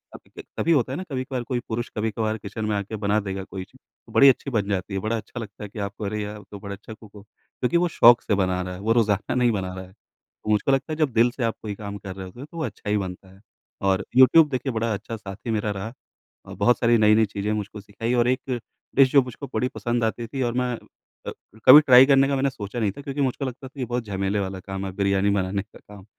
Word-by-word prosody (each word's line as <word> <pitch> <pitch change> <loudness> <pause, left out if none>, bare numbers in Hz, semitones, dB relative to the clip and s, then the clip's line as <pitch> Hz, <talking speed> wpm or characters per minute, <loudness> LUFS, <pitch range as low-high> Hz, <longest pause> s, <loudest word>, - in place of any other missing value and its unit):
तभी - - -15
त - - -25
तभी 170 - +1
होता 130 -4 +2
है - - -3
ना 185 - -4
कभी-कभार 130 -1 -3
कोई 125 0 -2
पुरुष 120 +1 -3
कभी-कभार 110 0 -1
किचन 105 +2 -6
में 105 - 0
आके 100 +2 -4
बना 105 +1 +1
देगा 95 -2 -4
कोई 95 -1 -7
चीज़ - - -20 0.3
तो - - -16
बड़ी 140 - +8
अच्छी 135 +1 0
बन 105 -4 0
जाती 95 0 -2
है। 95 - -1
बड़ा 110 +3 -1
अच्छा 120 +2 -8
लगता 105 -2 -8
है 105 - -7
कि 105 - -9
आप 100 +1 -5
अरे 105 +1 -2
यार 105 +1 -6
आप 105 - -14
तो 100 - -8
बड़ा 100 0 -7
अच्छा 105 +3 -11
कुक 110 -1 -16
हो। 100 - -11
क्योंकि 125 +7 -3
वो 175 0 +2
शौक 120 -6 +6
से 105 - 0
बना 95 -1 0
रहा 90 0 -5
है - - -9
वो 110 - 0
रोज़ाना 105 -2 +1
नहीं 125 -1 +3
बना 95 -4 -3
रहा 95 0 -7
है। 95 - -18 0.6
मुझको 105 +5 +2
लगता 135 +4 0
है - - -5
जब 150 -5 +1
दिल 115 +1 +4
से 125 - -3
आप 115 - 0
कोई 105 -2 -5
काम 100 0 -7
कर 95 -2 -8
रहे 95 - -7
होते 105 +7 -14
हो 140 - -7
तो 170 - -13
वो 160 - -2
अच्छा 105 -2 -7
ही 105 - +2
बनता 95 -1 -6
है। 95 - -19 0.4
और 95 0 +1
यूट्यूब 150 +4 +7
देखिए 130 0 -2
बड़ा 115 0 -1
अच्छा 110 +3 -5
साथी 100 +3 -7
मेरा 105 -1 -1
रहा। 105 +4 -5 0.5
अ, - - -8
बहुत 120 - +3
सारी 120 0 +4
नई-नई 110 0 +5
चीज़ें 100 0 -3
मुझको 105 0 -5
सिखाई 110 +4 -4
और 120 - +2
एक 130 -1 -1 0.4
डिश 135 -1 +5
जो 140 - +6
मुझको 125 +3 -8
बड़ी 125 +3 +1
पसंद 120 0 -1
आती 115 +1 -2
थी 135 +2 -4
और - - -4
मैं 125 -1 0 0.5
अ, - - -2 0.3
कभी 130 +3 +11
ट्राई 130 -2 +8
करने 135 -1 +5
का 140 - 0
मैंने 135 +1 +1
सोचा 115 -2 -6
नहीं 105 -3 +1
था 140 - -10
क्योंकि 140 0 -4
मुझको 135 +1 -1
लगता 130 +1 -6
था 135 +1 -15
ये 130 - -1
बहुत 120 -1 -3
झमेले 100 0 -1
वाला 95 -1 -4
काम 95 0 -4
है 95 - -4
बिरयानी 100 0 +1
बनाने 100 0 0
का 105 - -18
काम। 100 -2 -14
110 Hz, 270 wpm, -24 LUFS, 100-125 Hz, 0.6 s, कभी